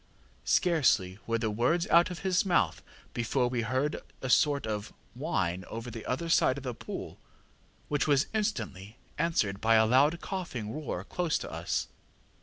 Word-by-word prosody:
ŌĆ£Scarcely 130 - +3
were 115 0 +1
the 110 -2 -1
words 125 +11 +1
out 170 +2 +6
of 180 0 -7
his 185 -1 +3
mouth 175 - +1 0.3
before 120 +2 +1
we 120 -1 -1
heard 130 +6 -1 0.2
a 130 - 0
sort 140 +1 +3
of 105 -1 -3 0.2
whine 95 - -1
over 115 +2 -6
the 115 0 -8
other 140 +7 -2
side 140 -5 +3
of 140 - -7
the 125 -2 -3
pool, - - -7 0.7
which 145 0 0
was 140 -2 +4
instantly 115 - -3 0.2
answered 110 -12 0
by 115 +1 +4
a 110 0 +6
loud 140 +8 +4
coughing 125 - -4
roar 140 - -4
close 170 - -1
to - - -7
us. - - -2
125 Hz, 165 wpm, -30 LUFS, 110-160 Hz, 0.7 s, out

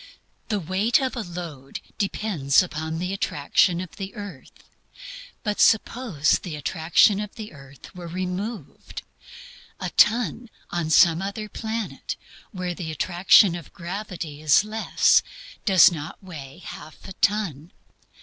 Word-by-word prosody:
The 210 -3 0
weight 195 - +1
of 260 -2 -2
a 240 - -2
load 170 -8 -7 0.2
depends 190 -8 +2
upon 160 -2 -4
the 180 +3 -3
attraction 175 0 +1
of 180 -2 -8
the 195 +1 -6
earth. 200 - -10 0.9
Suppose 220 - +2
the 175 -5 -6
attraction 165 +6 +3
of 210 -1 -6
the 215 -4 -8
earth 135 -1 -14
were 175 -1 -8
removed? 185 - -5 0.8
A - - -4
ton 230 +1 +2 0.2
on 170 -2 -2
some 165 +1 +5
other 200 +2 -4
planet, 220 0 -5 0.3
where 180 -4 -4
the 170 -2 -6
attraction 175 +4 +5
of 170 -3 -8
gravity 175 -5 -6
is 155 +4 +5
less, 220 +1 +3 0.4
does 190 -3 +7
not 155 -2 -6
weigh 155 -3 -10
half 155 +5 -10
a 190 - -8
ton. 195 -8 -1
180 Hz, 130 wpm, -24 LUFS, 160-210 Hz, 0.9 s, does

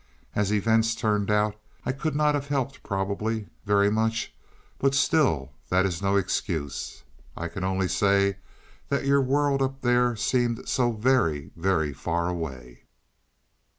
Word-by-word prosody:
As 105 -1 0
events 110 +2 +2
turned 105 -3 0
out 105 0 +2 0.3
I - - +1
could 145 +3 -3
not 150 0 +3
have 140 -1 -2
helped 135 -2 -2
probably, 100 +3 -2 0.2
very 100 0 +4
much, 110 +1 0 0.5
but 135 0 +2
still 130 - +2 0.2
that 95 +1 +3
is 90 -4 -2
no 100 0 +1
excuse. 80 -6 -2 0.3
I 85 - -3
can 95 +3 -6
only 95 0 0
say 100 0 +2 0.5
that 140 0 0
your 140 0 +4
world 140 +1 +1
up 135 0 -2
there 120 -1 +3
seemed 120 +2 0
so 120 -2 +2
very 110 - +1
very 80 -5 0
far 85 +5 -1
away. 65 -8 -6
105 Hz, 145 wpm, -26 LUFS, 95-130 Hz, 0.5 s, very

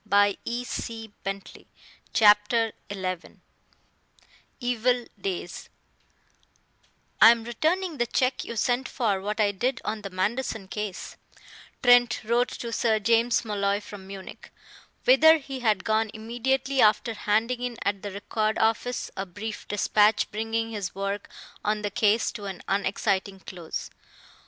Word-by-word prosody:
PHILIP 225 +2 0
TRENT. 195 0 -6 0.4
CHAPTER 215 +1 +4 0.2
XI 185 -3 -5 1.2
EVIL 245 0 +1 0.2
DAYS 180 -2 -4 1.5
"I 220 - +11
am 230 -1 +3
returning 320 +8 -1
the 240 - +1
check 255 +2 0
you 235 - -6
sent 245 +3 0
for 210 -7 0
what 210 +3 -3
I 205 -1 +3
did 240 +6 -1
on 215 0 -3
the 200 - -6
Manderson 205 +2 -2
case," 210 -2 -5 0.7
Trent 245 -2 +5
wrote 235 +3 +2
to 235 -1 -6
Sir 225 -1 +2
James 230 +3 +2
Molloy 200 -1 0
from 205 -2 -11
Munich, 195 -1 -10 0.5
whither 315 +6 +7
he 270 -3 -7
had 215 -6 +1
gone 220 0 +1
immediately 255 +4 0
after 215 +2 +3
handing 225 +4 0
in 245 -2 -3
at 200 -1 -1
the 205 - -5
Record 215 +2 -1
office 225 +2 0
a 195 0 -4
brief 210 +4 -7
despatch 210 +1 +2
bringing 225 +1 -2
his 200 -5 -4
work 200 +1 -3 0.3
on 210 0 0
the 205 - -2
case 210 +2 +2
to 205 -3 -8
an 195 -2 -6
unexciting 195 0 0
close. 175 -4 -6
220 Hz, 130 wpm, -26 LUFS, 200-240 Hz, 1.5 s, I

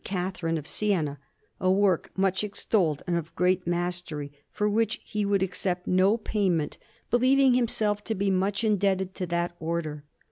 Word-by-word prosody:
Catherine 180 -3 -2
of 150 - -6
Siena 170 -10 0 0.4
a 185 - +1
work 190 -2 +2
much 190 +1 +1
extolled 195 -6 0
and 175 - 0
of 165 -1 -6
great 180 0 +1
mastery, 175 -4 -2 0.2
for 210 - 0
which 220 +1 +1
he 210 -1 -2
would 200 -1 +2
accept 180 -1 -2
no 190 +4 +3
payment, 190 -8 -1 0.3
believing 260 +2 +4
himself 215 -4 +1
to 220 - -1
be 195 +1 +1
much 195 +3 0
indebted 195 -3 +1
to 185 -2 -4
that 175 0 -1
Order. 160 -3 -3
190 Hz, 155 wpm, -27 LUFS, 175-205 Hz, 0.4 s, believing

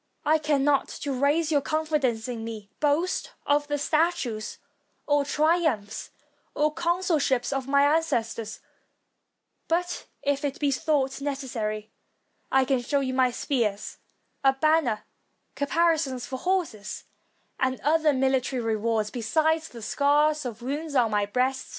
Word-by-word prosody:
I 315 +1 +4
cannot, 290 -2 +2
to 285 -2 -2
raise 290 +5 +2
your 290 -2 +3
confidence 295 -8 0
in 235 -3 -4
me, 220 -3 -7
boast 305 +5 0
of 290 0 +2
the 290 0 -1
statues, 290 -8 0 0.5
or 290 -1 +3
triumphs, 295 - 0 0.5
or 300 +1 +2
consulships 330 -7 +1
of 270 -1 -2
my 280 0 +4
ancestors; 230 -8 0 1.1
but 350 +1 -1 0.2
if 285 0 0
it 285 -1 -2
be 285 -2 +2
thought 275 -1 0
necessary, 230 -7 -3 0.6
I 265 0 +4
can 260 -2 +1
show 280 +3 0
you 260 -1 +2
spears, 225 -6 -2 0.4
a 270 0 +5
banner, 270 -6 +2 0.5
caparisons 290 -4 +1
for 260 0 -5
horses, 350 - -2 0.6
and 260 0 0
other 315 0 +3
military 265 -1 +1
rewards; 220 -1 0
besides 315 +7 +1
the 235 -2 -10
scars 295 +3 +2
of 235 -1 -6
wounds 290 +3 -3
on 235 -4 +3
my 205 -1 +1
breast. 255 +4 0
275 Hz, 130 wpm, -26 LUFS, 245-305 Hz, 1.1 s, a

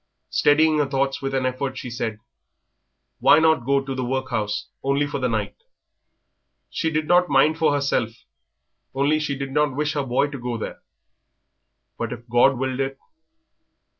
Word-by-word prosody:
Steadying 155 +1 +4
her 145 - +2
thoughts 135 0 -1
with 135 0 -2
an 130 -1 0
effort, 130 +1 -2
she 125 - -6
said, 115 -2 -3 1.0
"Why - - +6
not 160 -6 +3
go 140 0 +3
to 135 - -3
the 130 -1 -3
workhouse, 120 -5 -2 0.2
only 140 +1 +1
for 145 -1 -4
the 125 -1 0
night?... 110 -2 -2 1.2
She 160 - -1
did 155 -1 -1
not 180 0 +4
mind 150 +3 +3
for 155 -1 +3
herself, 140 -5 -1 0.7
only 145 +3 +2
she 145 -2 -2
did 135 0 -5
not 150 -1 +1
wish 150 +1 -1
her 145 - 0
boy 135 +2 0
to 140 - -6
go 120 -1 -3
there. 110 - -6 1.2
But 115 -1 -3
if 120 0 -11
God 120 +3 +4
willed 130 0 -2
it...." 135 0 -2
135 Hz, 165 wpm, -23 LUFS, 125-145 Hz, 1.2 s, Why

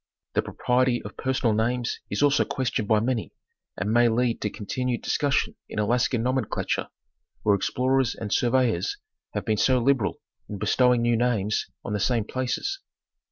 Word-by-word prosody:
The - - +2
propriety 125 0 +1
of 105 - -9
personal 130 -3 0
names 115 +2 0
is - - 0
also 145 0 +4
questioned 120 -5 -2
by 110 -1 +4
many, 115 0 -1 0.5
and 105 - -1
may 120 0 +5
lead 120 +1 0
to 105 - 0
continued 120 +4 -3
discus 145 -1 +1
sion - - 0 0.2
in - - -7
Alaskan 120 +2 +1
nomenclature, 130 +1 -1 0.6
where 105 - +4
explorers 130 +5 +1
and 105 -3 -4
surveyors 120 -7 +1 0.4
have - - -2
been 110 - +1
so 130 +4 +3
liberal 125 -4 +1 0.3
in 105 - -5
bestowing 120 +4 +3
new 120 0 +3
names 110 -3 0 0.2
on 105 - -3
the 105 - 0
same 115 +2 +1
places. 130 - -2
120 Hz, 160 wpm, -25 LUFS, 110-130 Hz, 0.6 s, may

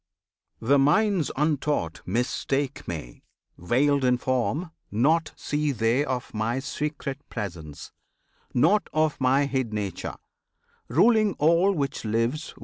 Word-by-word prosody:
The 140 +5 +3
minds 180 +4 +3
untaught 145 - 0
mistake 130 +5 -1
Me, 75 -8 -7 0.3
veiled 135 - +1
in 125 -1 +3
form; 130 +7 -1 0.2
Naught 150 +10 +2
see 150 0 -1
they 115 +2 +1
of 130 -3 -4
My 110 +3 -1
secret 140 0 -4
Presence, 80 -9 -7 0.6
nought 200 +10 +3
Of 155 -2 +1
My 135 +2 +3
hid 130 -4 -1
Nature, 100 -4 -4 0.7
ruling 215 - +4
all 170 +6 +4
which 140 -5 -2
lives. 115 +8 -1
135 Hz, 115 wpm, -26 LUFS, 115-150 Hz, 0.7 s, ruling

